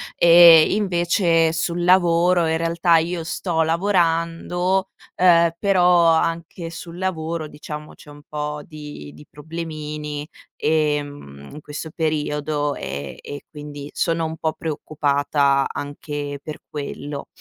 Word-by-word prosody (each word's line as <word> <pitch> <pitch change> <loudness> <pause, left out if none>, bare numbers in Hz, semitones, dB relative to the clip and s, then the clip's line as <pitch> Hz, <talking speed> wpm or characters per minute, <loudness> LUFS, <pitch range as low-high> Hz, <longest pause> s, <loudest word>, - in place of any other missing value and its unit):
E 170 -2 +8
invece 175 -4 +2
sul 170 +1 -2
lavoro 175 -1 +4
in 160 0 +1
realtà 165 0 +2
io 170 +1 -1
sto 165 0 -2
lavorando, 170 +1 0 0.3
ehm, 170 -2 +5
però 180 -3 +4
anche 165 +1 0
sul 170 +1 -9
lavoro, 165 -3 -3
diciamo, 150 +1 -9
c'è - - -16
un 145 0 -14
po' 150 0 -4
di 150 - -10
di 75 0 -14
problemini, 150 -1 -6 0.3
ehm, 145 - -2
in 150 - -9
questo 150 +2 -7
periodo 150 -2 -1
e 70 0 -6
e 145 -1 -8
quindi 145 -1 -9
sono 165 -1 0
un 160 0 -4
po' 160 - -1
preoccupata 145 -2 0
anche 145 0 -5
per 155 -1 -7
quello. 145 -1 -6
160 Hz, 120 wpm, -21 LUFS, 150-170 Hz, 0.3 s, E